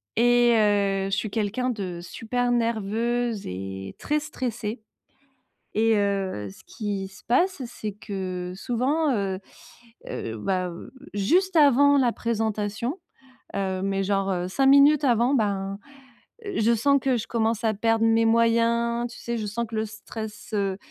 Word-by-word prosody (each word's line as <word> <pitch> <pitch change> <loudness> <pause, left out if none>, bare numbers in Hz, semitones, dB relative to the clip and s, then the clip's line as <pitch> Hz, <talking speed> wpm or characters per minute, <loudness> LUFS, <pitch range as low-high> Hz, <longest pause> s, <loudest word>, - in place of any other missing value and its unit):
et 240 +1 +5
heu, 200 -2 +2
je 195 - +1
suis 215 - -2
quelqu'un 225 +4 -1
de 190 -7 -4
super 245 +6 -2
nerveuse 230 0 0
et 95 +1 -6
très 300 +1 0
stressée. 235 -6 -4 0.9
Et 225 +1 +3
heu, 195 - -1
ce - - -15
qui 205 -3 -4
se 185 -2 -16
passe, 345 +5 +1
c'est 215 -3 -6
que 185 -3 -5
souvent, 265 +7 0
heu 195 -2 -1 0.7
heu, 110 0 -5
bah, 185 - -1
heu 170 - -10 0.2
juste 355 - +2
avant 285 -1 +6
la 250 -3 +3
présentation, 220 - -2 0.6
heu, 190 -1 -1
mais 195 0 0
genre, 195 0 0
heu, 180 -1 -1
5 270 +7 +2
minutes 280 +2 +6
avant 240 +2 +3
ben, 200 -3 -1 0.7
heu, 405 - -4
je 230 +2 +4
sens 280 +5 +3
que 265 -1 +2
je 225 - -5
commence 225 -1 0
à 220 - +2
perdre 225 +2 +2
mes 225 0 +4
moyens. 230 +1 +2
Tu - - -11
sais? 235 0 -3
Je 215 - -3
sens 230 +3 -2
que 220 - -7
le 220 0 0
stress, 215 0 -8
heu, 195 -2 0
220 Hz, 155 wpm, -25 LUFS, 195-240 Hz, 0.9 s, avant